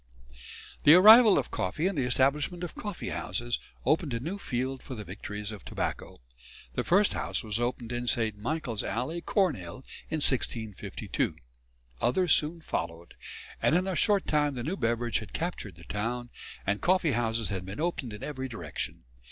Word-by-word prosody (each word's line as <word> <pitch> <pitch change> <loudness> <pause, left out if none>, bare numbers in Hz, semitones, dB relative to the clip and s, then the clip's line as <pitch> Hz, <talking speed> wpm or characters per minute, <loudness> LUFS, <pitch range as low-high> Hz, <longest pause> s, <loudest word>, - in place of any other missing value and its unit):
The 150 - +9
arrival 215 +3 +9
of 130 - -1
coffee 95 - -1
and 195 0 +1
the 130 -4 0
establishment 140 +7 +1
of 175 - -4
coffee 205 -4 -5
houses 120 -1 -2 0.3
opened 155 -6 +2
a - - -1
new 170 +11 -4
field 130 -3 -2
for 130 - -7
the 105 - -6
victories 105 +2 -6
of 105 -3 -9
tobacco. - - -4 0.5
The - - -1
first 200 +3 +4
house - - -2
was 110 0 -1
opened 120 -1 -2
in 120 0 -3
St. 110 -3 +1
Michael's 115 0 -2
Alley, 155 +9 -2
Cornhill, 130 - -1 0.2
in 160 - -1
1652. 120 - -1 0.7
Others 170 +7 +3
soon 160 +3 0
followed, 85 - -4 0.5
and 155 - +4
in 180 +1 +2
a 190 -1 -1
short 205 0 +3
time 145 -2 +1
the 120 - -4
new 165 +8 -2
beverage 120 - 0
had 110 - -10
captured 160 - -3
the 85 - -14
town, 115 +6 -3 0.3
and 100 +1 0
coffee 180 -3 +3
houses 115 -2 +1
had 95 -3 -3
been 95 +6 -7
opened 155 -7 -2
in 105 - -8
every 130 -3 -4
direction. 85 - -5
125 Hz, 170 wpm, -29 LUFS, 110-165 Hz, 0.7 s, The